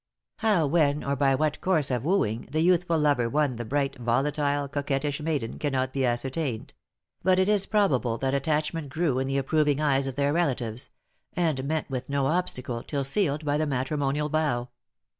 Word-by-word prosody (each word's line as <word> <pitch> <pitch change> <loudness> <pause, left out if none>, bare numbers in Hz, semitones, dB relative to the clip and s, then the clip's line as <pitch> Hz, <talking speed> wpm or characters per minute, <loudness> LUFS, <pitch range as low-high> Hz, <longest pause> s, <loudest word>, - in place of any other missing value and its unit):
How, 210 -8 +2
when, 150 -1 +2
or 140 0 -1
by 135 0 +3
what 150 +1 -1
course 160 -7 +1
of 125 -2 -1
wooing, 140 - 0
the 155 +3 0
youthful 175 -1 +3
lover 145 -6 +2
won 145 -2 +1
the 120 - -4
bright, 140 +2 -1
volatile, 140 +4 0
coquettish 140 +1 -2
maiden, 150 -7 -2
cannot 130 -3 -1
be 135 -2 +1
ascertained; 125 0 -2 0.5
but 185 +1 +3
it 190 0 +3
is 205 -2 +2
probable 135 - +1
their 135 +1 -1
attachment 150 +2 -1
grew 155 -3 0
in 130 - -1
the 135 0 0
approving 145 +1 +1
eyes 140 -3 +2
of 135 - -4
their 140 +1 +1
relatives, 125 -9 -1 0.4
and 160 -6 0
met 155 +2 -1
with 130 -1 -5
no 140 -1 0
obstacle 130 -7 -1
till 140 +1 -3
sealed 150 0 0
by 145 0 +1
the 155 - 0
matrimonial 140 +2 -1
vow. 145 -6 0
145 Hz, 180 wpm, -26 LUFS, 130-155 Hz, 0.5 s, by